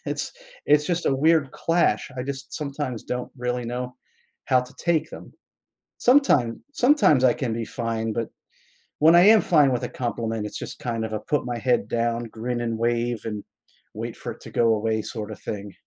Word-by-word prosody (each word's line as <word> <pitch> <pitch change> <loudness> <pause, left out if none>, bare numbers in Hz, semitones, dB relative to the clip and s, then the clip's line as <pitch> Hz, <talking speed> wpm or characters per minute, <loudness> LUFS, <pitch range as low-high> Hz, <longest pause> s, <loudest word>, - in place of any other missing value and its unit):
it's - - -3 0.3
it's 150 0 +4
just 175 -1 -1
a 135 - +3
weird 155 0 +3
clash, 165 -3 +1
I 125 - -2
just 135 0 -6
sometimes 140 -5 -4
don't 125 0 -4
really 125 -1 -2
know 125 +1 -4 0.5
how 130 -1 +4
to 125 +1 -11
take 170 -3 0
them. - - -11 0.7
Sometime 240 - +3
sometimes 250 - +4
I 125 - +6
can 125 -5 -2
be 115 0 -3
fine 115 -1 -3
but, 115 0 -2 0.7
when 160 +3 +7
I 175 - +8
am 220 -1 +7
fine 150 -5 +4
with 125 - -2
a - - -2
compliment, 115 -3 -3
it's - - -7
just - - -7
kind 115 -2 -3
of 110 - -6
a 110 - -1
put 145 +4 -1
my 120 -1 -3
head 125 +2 +1
down, 115 0 0
grin 120 +2 -4
and 115 -1 -2
wave, 120 0 0
and 105 -2 -4 0.5
wait - - -5
for - - -5
it - - -12
to - - -10
go 115 -1 +3
away 110 +1 0
sorta 110 -1 -6
thing. 100 -1 -6
125 Hz, 195 wpm, -24 LUFS, 115-145 Hz, 0.7 s, I